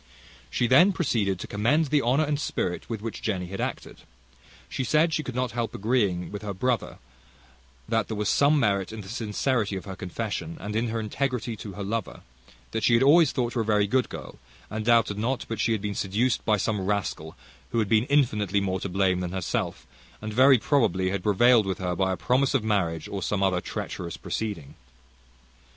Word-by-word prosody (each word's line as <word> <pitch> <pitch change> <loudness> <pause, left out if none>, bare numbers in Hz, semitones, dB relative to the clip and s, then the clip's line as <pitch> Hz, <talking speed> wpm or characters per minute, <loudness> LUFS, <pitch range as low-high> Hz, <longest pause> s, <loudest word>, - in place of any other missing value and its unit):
She 120 - 0
then 170 +11 +6
proceeded 110 - 0
to - - -5
commend 135 +9 +1
the 150 -2 +4
honour 130 +6 +2
and 145 -1 -1
spirit 90 -10 -3
with 110 -3 -4
which 115 - -5
Jenny 95 -5 -2
had 100 - -5
acted. - - -4 0.7
She 130 - -3
said, 155 +5 +2
she 155 - +1
could 130 -5 -7
not 125 -1 -1
help 120 -1 -3
agreeing 100 -6 0
with 105 0 -6
her 105 -2 -5
brother, 125 +2 -1 0.9
that 115 -3 0
there 110 - -4
was 105 -1 -1
some 145 +5 +4
merit 100 -5 +1
in 110 -1 -7
the 95 - -11
sincerity 110 -1 -1
of 95 - -6
her 95 - -6
confession, 90 -3 -4
and 105 +1 -5
in 115 +2 +1
her 115 0 -2
integrity 120 +1 -2
to 100 -1 -8
her 100 - -6
lover: 110 0 -4 0.5
that 110 - -2
she 115 - +4
had 115 - +4
always 155 +1 +6
thought 120 -3 -1
her 120 - 0
a - - 0
very 105 -1 +2
good 125 +5 +1
girl, 65 -5 -9 0.3
and 110 0 -3
doubted 115 -3 +3
not 125 +4 -1
but 115 -2 -4
she 115 - +1
had 110 -2 -1
been 105 -1 -2
seduced 105 +6 0
by 110 -1 +3
some 105 0 -1
rascal, 95 -5 -2 0.4
who - - -1
had 110 -3 +2
been 110 +2 +3
infinitely 110 -8 +2
more 95 -1 -1
to 100 - -4
blame 95 0 +1
than 90 0 -4
herself, 95 -2 -3 0.3
and 110 0 -6
very 130 +3 +6
probably 100 - +1
had 100 -1 -2
prevailed 110 +2 +4
with 95 - -1
her 90 -1 -2
by 95 0 +1
a 95 - -2
promise 130 +2 +1
of 125 - +1
marriage, 90 -7 0
or 100 - -5
some 100 0 -1
other 90 -2 +2
treacherous 85 -2 -5
proceeding. 100 -11 -4
110 Hz, 205 wpm, -26 LUFS, 95-125 Hz, 0.9 s, then